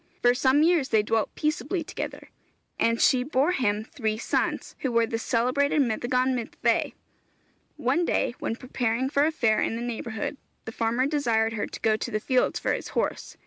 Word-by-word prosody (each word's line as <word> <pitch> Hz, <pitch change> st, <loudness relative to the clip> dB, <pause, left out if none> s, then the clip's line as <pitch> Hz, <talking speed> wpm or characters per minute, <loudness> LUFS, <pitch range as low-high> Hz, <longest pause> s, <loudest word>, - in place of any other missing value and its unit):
For 245 Hz, 0 st, +6 dB
some 265 Hz, +3 st, +3 dB
years 325 Hz, -5 st, +3 dB
they 215 Hz, -1 st, +3 dB
dwelt 220 Hz, 0 st, -1 dB
peaceably 330 Hz, +3 st, -1 dB
together, -, -, -6 dB, 0.5 s
and 230 Hz, 0 st, +2 dB
she 255 Hz, -, +4 dB
bore 275 Hz, +4 st, +1 dB
him 215 Hz, -, 0 dB
three 220 Hz, -2 st, -3 dB
sons, 235 Hz, -, -2 dB
who 260 Hz, -, -1 dB
were 230 Hz, -1 st, +3 dB
the 225 Hz, 0 st, -3 dB
celebrated 255 Hz, +6 st, +1 dB
Meddygon 250 Hz, +1 st, +1 dB
Myddfai. 240 Hz, -3 st, 0 dB, 0.8 s
One 345 Hz, -, +1 dB
day, 290 Hz, -, 0 dB
when 225 Hz, -, -2 dB
preparing 250 Hz, +1 st, -2 dB
for 285 Hz, 0 st, +3 dB
a 315 Hz, -, +2 dB
fair 230 Hz, -8 st, +2 dB
in -, -, 0 dB
the 230 Hz, -, -4 dB
neighbourhood, 235 Hz, +2 st, -4 dB, 0.3 s
the 225 Hz, -, -5 dB
farmer 230 Hz, +3 st, 0 dB
desired 230 Hz, -7 st, +1 dB
her 210 Hz, -, -2 dB
to -, -, -9 dB
go 220 Hz, -1 st, +2 dB
to -, -, -4 dB
the 215 Hz, -, -1 dB
field 255 Hz, +3 st, +1 dB
for -, -, 0 dB
his -, -, -4 dB
horse. -, -, -2 dB
245 Hz, 185 wpm, -26 LUFS, 225-275 Hz, 0.8 s, For